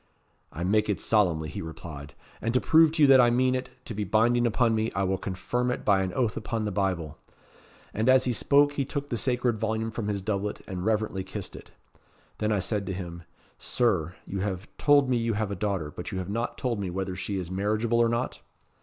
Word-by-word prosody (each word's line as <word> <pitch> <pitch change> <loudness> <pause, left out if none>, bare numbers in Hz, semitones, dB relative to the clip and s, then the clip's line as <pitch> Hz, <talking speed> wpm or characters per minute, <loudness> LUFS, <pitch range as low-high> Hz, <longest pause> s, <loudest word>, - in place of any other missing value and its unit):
'I 80 +5 -5
make 105 +3 +2
it 100 - 0
solemnly,' 85 -8 +2
he - - -5
replied. 80 -3 -8 0.3
'And 115 +2 -1
to - - +5
prove 160 +2 +5
to 160 -2 +3
you - - +8
that 135 -1 +8
I 120 - +5
mean 130 +2 +2
it 130 0 -2 0.2
to - - -5
be 105 0 -2
binding 120 +4 +3
upon 115 0 +2
me, 110 0 0
I 95 - +1
will 95 0 0
confirm 120 +7 -2
it 125 - -3
by 100 -2 +4
an 95 -1 -2
oath 120 -4 0
upon 110 0 -3
the 105 - -2
Bible.' 90 -6 -2 0.7
And 110 +4 +1
as 130 0 +6
he 125 - 0
spoke 145 +5 +3
he 140 - 0
took 140 +1 -4
the - - -1
sacred 120 0 0
volume 110 0 -1
from 110 -1 -4
his 100 -2 -2
doublet, 105 0 -2
and 90 -2 -5
reverently 110 -2 0
kissed - - -6
it. - - -12 0.7
Then 105 0 0
I 105 - +2
said 100 +1 -2
to 95 - -2
him 85 -2 -7 0.3
'Sir, 90 -8 0
you 95 - -4
have 95 0 -3
told 145 -2 +5
me 125 -1 +2
you 115 -1 0
have 105 -1 -2
a - - -2
daughter, 95 -6 -2
but 90 - -7
you 95 - -3
have 95 +1 -4
not 115 +3 -2
told 120 -4 -1
me 95 -2 -2
whether 95 +1 -3
she 100 +2 -3
is 90 -2 -5
marriageable 110 +5 0
or 115 -1 +4
not?' 120 +2 -2
105 Hz, 230 wpm, -27 LUFS, 95-120 Hz, 0.7 s, you